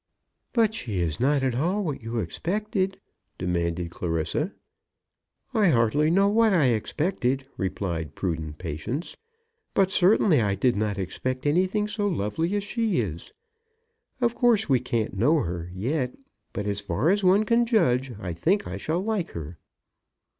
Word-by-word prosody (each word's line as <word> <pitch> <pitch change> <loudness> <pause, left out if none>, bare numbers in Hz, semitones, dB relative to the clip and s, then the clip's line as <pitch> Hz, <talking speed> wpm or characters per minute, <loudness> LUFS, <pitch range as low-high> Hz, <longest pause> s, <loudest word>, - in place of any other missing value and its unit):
"But 225 -3 +3
she 105 - -3
is 80 -3 -1
not 140 +2 +2
at 130 -2 +1
all 175 - 0
what 150 -7 -3
you 115 +1 -4
expected?" 190 - -2 0.4
demanded 85 -1 -1
Clarissa. 85 - -2 1.0
"I 215 -4 +4
hardly 145 +2 +3
know 195 +4 +4
what 220 0 +4
I 150 -8 +4
expected," 135 - -1
replied 90 -4 -2
the - - -20
prudent 80 -5 -3
Patience. 90 - -4 0.6
"But 190 -1 +3
certainly 185 - +4
I 100 -2 +1
did 120 +5 +2
not 105 -1 -1
expect 130 +8 -3
anything 185 +7 +2
so 210 -1 -1
lovely 165 - -1
as 205 - 0
she 220 - 0
is. 85 -8 -4 0.9
Of 240 -2 +2
course, 235 -3 +3
we 130 -4 +3
can't 115 -3 -2
know 150 +9 +4
her 85 0 -4
yet; 125 - -2 0.4
but 100 - -4
as 100 0 -1
far 140 - +1
as 200 0 +1
one 190 +3 +5
can 235 +2 +2
judge, 135 - +2
I 90 -4 -4
think 180 - +1
I 95 - -5
shall 160 - -1
like 210 -5 -2
her." 80 0 -7
135 Hz, 155 wpm, -26 LUFS, -, 1.0 s, one